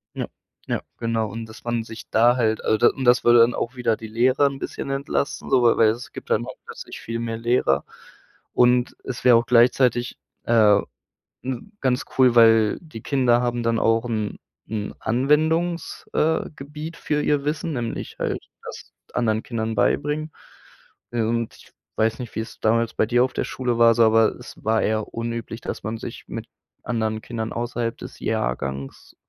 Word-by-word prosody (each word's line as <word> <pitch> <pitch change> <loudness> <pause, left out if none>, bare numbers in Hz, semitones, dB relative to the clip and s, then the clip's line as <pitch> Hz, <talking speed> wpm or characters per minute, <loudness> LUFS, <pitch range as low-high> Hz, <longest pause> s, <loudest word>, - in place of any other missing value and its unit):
Ja, - - -3 0.4
ja, - - -1 0.2
genau. 115 -1 -1
Und 115 +2 -6
das 110 - -13
man 120 -1 -1
sich 110 0 -10
da 120 +2 +4
halt 110 -3 0
also 110 - +2
das 120 - +5
und 135 - -5
das 125 0 +5
würde 120 0 +6
dann 115 +1 +5
auch 120 +3 -3
wieder 120 -3 0
die 110 - -8
Lehrer 130 +6 +3
'n 135 -1 -5
bisschen - - -5
entlasten 135 +1 -2
so, 130 -2 +4
weil 115 - +4
weil 110 - +5
es 115 +3 -4
gibt - - -10
dann - - +1
auch - - -8
plötzlich - - -9
viel 115 0 -4
mehr 115 -1 -3
Lehrer. 115 - +1 0.7
Und 125 0 +3
es 125 -2 -6
wäre 125 -2 +7
auch 115 - +1
gleichzeitig, 120 0 +3 0.3
äh, 110 -3 +5 0.6
ne, 125 -2 -3 0.2
ganz 130 0 +1
cool, 130 -2 +6
weil 115 -2 +5
die 155 -10 -10
Kinder 125 -3 +2
haben 120 -1 -1
dann 115 0 +1
auch 115 +1 +2
'n 110 -3 -3 0.3
'n 105 -2 -4
Anwendungs, 155 +8 0
äh, 160 +1 +1
gebiet 150 +4 -8
für 150 -1 -1
ihr 145 -1 +1
Wissen, 155 +2 -2
nämlich 120 -3 -4
halt - - -1 0.2
das - - -9 0.2
anderen 110 -2 0
Kindern 110 -2 -3
beibringen. 150 +5 0 0.8
Und 115 0 -1
ich - - -18 0.3
weiß 110 0 +2
nicht, 120 -3 -7
wie - - -1
es 110 - -9
damals 115 +1 +1
bei - - +2
dir 120 +2 +3
auf 130 - -1
der - - -1
Schule 125 -2 -2
war 115 0 +6
so 115 - +5
aber 110 0 +4
es - - -11
war 110 0 +2
eher 110 0 -1
unüblich, 115 0 -4
dass - - -5
man 110 +2 -3
sich - - -8
mit - - -6 0.4
anderen 110 -2 -1
Kindern 110 -2 -5
außerhalb 120 0 -2
des - - -10
Jahrgangs 65 +3 -3
115 Hz, 185 wpm, -23 LUFS, 110-125 Hz, 0.8 s, wäre